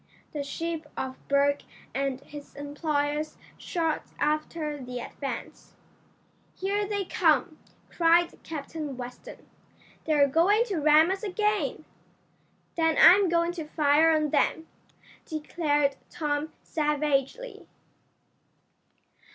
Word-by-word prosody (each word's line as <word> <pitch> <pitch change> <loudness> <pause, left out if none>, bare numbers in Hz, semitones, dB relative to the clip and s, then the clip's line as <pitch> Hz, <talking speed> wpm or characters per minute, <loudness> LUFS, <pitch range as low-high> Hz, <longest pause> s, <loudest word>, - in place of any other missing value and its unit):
The 295 - -2
ship 325 +2 -4
of 260 0 -3
Berg 280 0 +2 0.3
and 275 -1 -2
his 290 -1 -12
employers 290 +1 -2 0.2
shot 325 -4 -1 0.2
after 300 -1 -2
the 250 0 -6
Advance. 275 +3 -7 0.8
"Here 405 +2 -1
they 405 -1 -2
come!" 315 -3 +2 0.3
cried 335 0 +3
Captain 300 -2 -6
Weston. 250 - -9 0.6
"They're 295 -3 +4
going 360 - +4
to 385 - -1
ram 310 +3 +5
us 385 - -2
again!" 420 0 -1 0.9
"Then 325 -1 +2
I'm 385 0 +8
going 340 0 +2
to 330 -3 -6
fire 300 +1 +4
on 305 -2 +2
them!" 320 +2 +1 0.6
declared 295 -3 0
Tom 295 0 -2
savagely. 300 - -1
310 Hz, 100 wpm, -27 LUFS, 285-335 Hz, 0.9 s, I'm